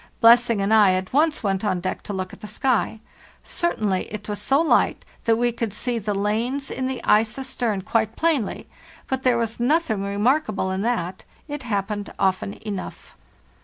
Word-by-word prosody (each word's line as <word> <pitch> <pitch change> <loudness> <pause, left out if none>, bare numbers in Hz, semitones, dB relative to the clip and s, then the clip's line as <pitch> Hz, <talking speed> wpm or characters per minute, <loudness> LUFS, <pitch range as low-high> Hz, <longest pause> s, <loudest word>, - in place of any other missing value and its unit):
Blessing 230 -2 +6
and 200 +2 +1
I 205 -4 +6
at 185 +3 -4
once 300 0 +2
went 195 -1 0
on 185 -4 0
deck 185 +1 -3
to - - -1
look 185 -2 -4
at - - -13
the 210 - -7
sky. 230 -3 0 0.4
Certainly 210 - -1
it 210 -1 -6
was 205 -1 -4
so 270 +6 +3
light 330 - +2 0.2
that 230 - +4
we 240 +1 +1
could 230 -3 -3
see 240 +2 -1
the 205 -1 -2
lanes 230 +7 -1
in 260 - -2
the 260 -2 -4
ice 215 +2 +3
astern 245 -7 -2
quite 220 +1 0
plainly; 310 -10 0 0.4
but 265 -1 -1
there 250 -2 +3
was 230 -1 -2
nothing 245 -4 +1
remarkable 205 0 0
in 190 +1 -2
that, 195 -6 -2 0.2
it 290 -1 -5
happened 205 -3 -3
often 190 +1 0
enough. 200 -3 -6
220 Hz, 180 wpm, -23 LUFS, 200-250 Hz, 0.4 s, Blessing